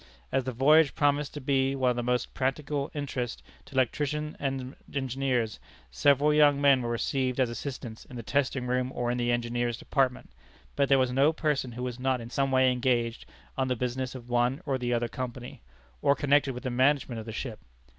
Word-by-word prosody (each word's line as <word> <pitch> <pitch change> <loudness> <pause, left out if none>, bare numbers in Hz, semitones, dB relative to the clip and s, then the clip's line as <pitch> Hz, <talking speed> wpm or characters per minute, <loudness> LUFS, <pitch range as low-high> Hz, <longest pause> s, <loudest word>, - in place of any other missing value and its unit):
As 135 -1 0
the 130 - -2
voyage 145 +5 +4
promised 145 0 +1
to - - -4
be 135 0 +1
one 130 -2 +2
of - - -2
the - - -2
utmost 125 0 -1
practical 140 +1 -1
interest 130 -4 -4 0.2
to 140 - -14
electricians 150 +4 0
and 135 -1 -3 0.2
engineers, 130 -4 -1 0.3
several 140 - +3
young 145 -2 +5
men 140 -2 +5
were 120 - -3
received 130 +2 -1
as 125 -3 +2
assistants 120 -3 -6
in 130 - -12
the 120 - -6
testing 130 +2 0
room 125 +1 0
or 120 0 0
in 125 - -2
the 120 0 +1
engineers' 120 0 -1
department; 130 - -1 0.4
but 140 - +2
there 135 - +6
was 130 -1 +2
no 135 +4 +4
person 150 -6 -1
who 125 +2 -5
was 125 -1 -4
not 130 0 +1
in 115 0 -9
some 135 +1 +1
way 130 -1 +4
engaged 120 -2 0 0.3
on 130 -1 0
the 125 - 0
business 125 +2 -3
of 120 -2 -9
one 120 +3 +1
or 135 -3 -1
the 120 -1 -2
other 120 0 +1
company, 125 0 -6 0.4
or 140 - +4
connected 140 -2 +2
with 125 - -7
the 130 - -2
management 130 -1 +2
of 110 - -8
the - - -4
ship. 110 0 -5
130 Hz, 205 wpm, -28 LUFS, 120-140 Hz, 0.4 s, there